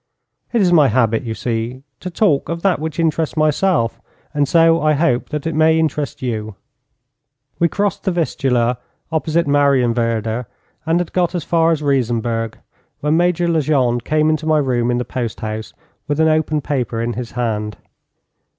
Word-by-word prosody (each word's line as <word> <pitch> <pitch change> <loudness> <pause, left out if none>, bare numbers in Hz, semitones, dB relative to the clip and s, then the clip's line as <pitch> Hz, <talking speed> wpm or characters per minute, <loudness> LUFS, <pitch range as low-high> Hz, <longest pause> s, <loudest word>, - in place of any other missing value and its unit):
It 235 - +2
is 180 -2 +3
my 150 -4 +6
habit, 115 -2 +2
you 115 -3 -5
see, 120 +3 -3 0.2
to 185 - -5
talk 170 -5 +1
of 170 0 -4
that 195 -5 +2
which 160 +1 -5
interests 160 -1 0
myself 155 -4 +1 0.3
and 145 -1 +1
so 165 +2 +4
I 155 0 +3
hope 145 -5 +1
that 150 -1 -4
I 165 - 0
may 160 +1 +3
interest 150 -4 -2
you. 110 -4 -3 1.0
We 170 - +4
crossed 205 +3 -2
the 190 - +2
Vistula 125 -8 0 0.3
opposite 160 +1 0
Marienwerder, 120 -5 +1 0.4
and 165 +2 +2
had 175 - -6
got 180 -1 +1
as 175 - -2
far 165 0 +2
as 155 -2 -1
Riesenberg, 115 -4 0 0.5
when 150 +2 +1
Major 175 0 +2
Legendre 140 -7 +1
came 155 +3 +2
into 155 0 -2
my 155 -1 +3
room 125 -4 +1
in 120 - +1
the 125 - -2
post 120 -4 -4
house 110 0 -5 0.4
with 145 0 -1
an 160 - +4
open 155 -1 +1
paper 125 -5 -2
in 120 +1 -1
his 120 -1 -6
hand. 105 -3 -2
145 Hz, 170 wpm, -18 LUFS, 120-160 Hz, 1.0 s, my